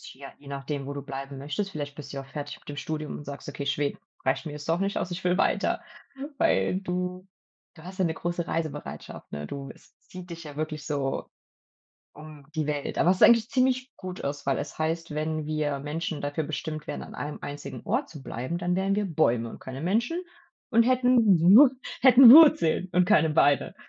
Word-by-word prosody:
tja, 135 +1 -11
je 140 - -15
nachdem, 140 0 -5
wo 140 - -4
du 140 -1 -6
bleiben 135 0 -7
möchtest. 150 +9 -3
Vielleicht 145 -4 -5
bist 145 -2 -9
du 140 - -5
ja - - -4
auch 135 - -16
fertig 145 +1 -7
mit - - -20
dem 145 - -6
Studium 155 0 -4
und 150 - -10
sagst: 140 -1 -8
„Okay, 140 - -5
Schweden 140 +1 -1 0.3
reicht 130 +5 0
mir 150 - -5
jetzt 150 +1 -8
doch 165 +1 +2
nicht 195 +1 -1
aus. 180 - -3
Ich 175 +1 -6
will 180 +1 +2
weiter.“ - - +1 0.6
Weil, 95 - +2
du 180 0 -4 0.5
du 160 - -15
hast 185 +2 -10
ja 185 - +2
'ne 160 - 0
große 175 0 -3
Reisebereitschaft, 155 -3 -5
ne? 75 0 -5
Du 135 - -7
es - - -23
zieht 185 -1 -11
dich 170 0 -8
ja 150 -1 -10
wirklich 155 -1 -4
so 140 -3 -2 0.9
um 150 -1 -12
die 155 -1 -1
Welt. 145 -1 -3
Aber 175 - +3
es 185 - 0
ist - - +3
eigentlich 230 -1 +6
ziemlich 255 0 +1
gut 185 -1 -7
aus, 140 0 -4
weil 135 - +1
es - - -6
heißt, 165 0 -2
wenn 155 0 -2
wir 150 -2 -1
Menschen 155 +2 -4
dafür 145 +2 -2
bestimmt 155 0 -5
wären, - - -5
an - - -11
einem 150 0 -5
einzigen 145 -4 -7
Ort - - -1
zu 150 -4 -10
bleiben, 130 +9 -4
dann 180 0 -1
wären 195 +1 +1
wir 210 - 0
Bäume 125 -9 +1
und - - -11
keine 130 +2 -8
Menschen 235 - 0 0.5
und 230 0 +5
hätten 245 -6 +4
Wur 220 - +8 0.3
hätten 255 -2 +9
Wurzeln 185 - +7
und 180 0 +4
keine 165 -6 +4
Beine. 145 -3 +2
155 Hz, 215 wpm, -27 LUFS, 145-185 Hz, 0.9 s, hätten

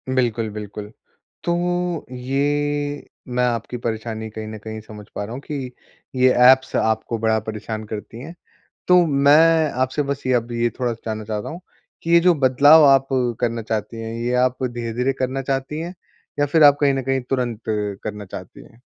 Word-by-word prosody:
बिल्कुल, 115 -3 0
बिल्कुल। 105 0 -8 0.5
तो 175 -1 -1
ये 145 +3 -1 0.2
मैं 125 0 0
आपकी 120 0 -2
परेशानी 110 -1 -4
कहीं 110 0 -7
न 110 0 -7
कहीं 110 0 -6
समझ 105 -1 -11
पा - - -3
रहा 105 +3 -7
हूँ 130 - -6
कि 140 -4 -5 0.4
ये 130 0 +5 0.2
ऐप्स 130 0 +3
आपको 110 +1 0
बड़ा 110 0 +2
परेशान 110 0 -6
करती 110 +2 -7
हैं। 165 +6 -9 0.5
तो 180 -1 +6
मैं 155 +2 +4
आपसे 130 +3 0
बस 140 0 -4
ये 130 - +2
अब 120 0 -1
ये 120 0 0
थोड़ा-सा 120 -2 -2
जानना 110 -1 -3
चाहता 105 -1 -4
हूँ 170 +3 -7 0.4
कि 165 - -4
ये 170 0 +7
जो 175 0 +4
बदलाव 145 +3 +6
आप 135 0 +5 0.3
करना 115 -1 -1
चाहती 110 +1 -4
हैं, 115 0 -5
ये 120 +2 -2
आप 125 +1 +1
धीरे-धीरे 120 +1 -2
करना 130 +1 -2
चाहती 135 +2 -2
हैं? 175 +2 -6 0.4
या 145 - +3
फ़िर 155 +2 +3
आप 145 -1 +8
कहीं 140 -1 +3
न 135 - -2
कहीं 135 +1 0
तुरंत 125 -4 -1
करना 105 0 -3
चाहती - - -10
हैं? 115 - -19
125 Hz, 180 wpm, -21 LUFS, 110-145 Hz, 0.5 s, आप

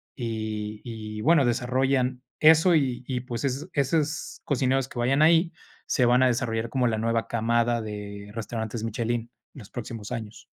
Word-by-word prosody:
y 110 -3 -4
y 110 -2 -6
bueno, 155 +1 +4
desarrollan 125 +1 +1 0.2
eso, 160 +3 +6
y 130 -5 0
y 125 -2 -2
pues, 120 0 -4
esos 135 +1 -2
esos 150 +3 -1
cocineros 135 -1 +1
que 120 - -7
vayan 135 +4 +2
ahí, 165 +2 +5 0.3
se 130 - +1
van 125 +1 +4
a 130 - +6
desarrollar 115 -2 0
como 125 -1 +1
la 110 -2 0
nueva 115 +1 0
camada 115 +1 +1
de 105 -1 -7
restaurantes 110 0 -4
Michelin 115 +1 -1 0.3
en - - -11
los 105 - -12
próximos 115 -2 -7
años. 115 -3 -6
120 Hz, 165 wpm, -26 LUFS, 110-135 Hz, 0.3 s, eso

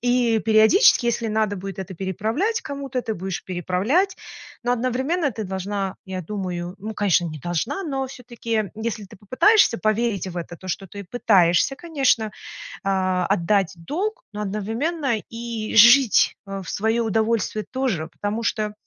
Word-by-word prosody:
и 245 -2 +2
периодически, 225 - +5
если 235 -1 0
надо 215 -2 0
будет 195 0 -7
это 190 0 -6
переправлять 220 - -1
кому-то, 275 -2 -4
ты 220 - -3
будешь 190 0 -5
переправлять. 195 - 0 0.5
Но 245 - +2
одновременно 260 +6 0
ты 220 -1 -5
должна, 190 0 -3
я 190 -1 -5
думаю- 180 -1 -4
ну, 215 +2 -6
конечно, 190 -4 +2
не 155 -2 -6
должна- 175 - -2
но 270 -3 -2
все-таки, 230 -5 -3
если 220 -1 -4
ты 190 - -14
попытаешься 255 - +4
поверить 215 -2 0
в 180 -1 -7
это, 170 0 -7
то 185 - -13
что 195 +2 -3
ты 200 +3 -8
пытаешься, 190 +2 +3
конечно, 270 -10 +1 0.5
а, 185 -2 +1
отдать 195 0 +1
долг, 405 - -3
но 210 - -4
одновременно 225 - -1
и 230 -1 -5
жить, 235 +2 +7
э, 195 0 -5
в 170 - -8
свое 225 +3 0
удовольствие 220 -1 0
тоже. 255 -12 -1
Потому 210 +3 -4
что 210 0 -1
215 Hz, 155 wpm, -23 LUFS, 190-245 Hz, 0.5 s, жить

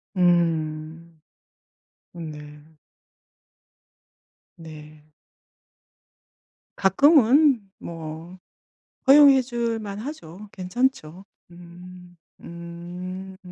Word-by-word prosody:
음. 165 -2 -1 1.0
음 165 -2 -7
네. 150 0 -12 2.0
네. 155 -2 -13 1.7
가끔은 265 - +4
뭐 165 +2 -9 0.7
허용해 275 -1 +7
줄 235 -2 -3
만 205 -1 -7
하죠. 210 - -9
괜찮죠. 190 -3 -3 0.3
음 175 +1 -14 0.3
음. 180 +2 -9
180 Hz, 90 characters per minute, -23 LUFS, 165-215 Hz, 2.0 s, 허용해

